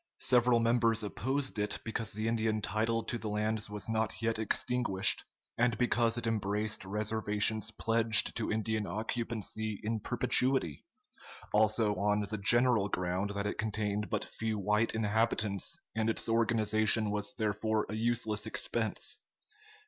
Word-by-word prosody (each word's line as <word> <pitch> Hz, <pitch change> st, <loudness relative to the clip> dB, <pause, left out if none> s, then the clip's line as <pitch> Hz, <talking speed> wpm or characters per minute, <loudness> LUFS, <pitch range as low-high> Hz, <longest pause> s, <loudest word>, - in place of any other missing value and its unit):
Several 125 Hz, -1 st, +4 dB
members 115 Hz, -1 st, +2 dB
opposed 130 Hz, +4 st, -2 dB
it, 105 Hz, 0 st, 0 dB
because 110 Hz, -1 st, -1 dB
the 110 Hz, +2 st, -1 dB
Indian 110 Hz, -1 st, 0 dB
title 110 Hz, +2 st, -1 dB
to 120 Hz, +1 st, -4 dB
the 110 Hz, -, -4 dB
lands 105 Hz, 0 st, -1 dB
was 105 Hz, -2 st, -5 dB
not 110 Hz, -1 st, -1 dB
yet 115 Hz, -1 st, -1 dB
extinguished, 110 Hz, -2 st, +1 dB, 0.4 s
and 120 Hz, -2 st, +2 dB
because 120 Hz, -1 st, +1 dB
it 120 Hz, -, -3 dB
embraced 105 Hz, -1 st, -1 dB
reservations 105 Hz, +1 st, +1 dB
pledged 115 Hz, -1 st, +3 dB
to 115 Hz, -, -2 dB
Indian 110 Hz, -1 st, -1 dB
occupancy 110 Hz, +1 st, -3 dB
in 110 Hz, +1 st, -1 dB
perpetuity; 125 Hz, -, 0 dB, 0.7 s
also 110 Hz, 0 st, +3 dB
on 105 Hz, +2 st, +1 dB
the 105 Hz, +1 st, -4 dB
general 120 Hz, 0 st, +3 dB
ground 90 Hz, +2 st, -2 dB
that 100 Hz, 0 st, -2 dB
it 105 Hz, -, -3 dB
contained 105 Hz, -1 st, -2 dB
but -, -, -2 dB
few 110 Hz, -1 st, -3 dB
white 105 Hz, +3 st, +1 dB
inhabitants, 110 Hz, -2 st, 0 dB, 0.2 s
and 110 Hz, 0 st, 0 dB
its 115 Hz, -, -2 dB
organization 110 Hz, -1 st, +2 dB
was 105 Hz, +4 st, -2 dB
therefore 110 Hz, -1 st, -1 dB
a 105 Hz, -, -6 dB
useless 110 Hz, -2 st, -1 dB
expense. -, -, -2 dB
110 Hz, 140 wpm, -31 LUFS, 105-115 Hz, 0.7 s, Several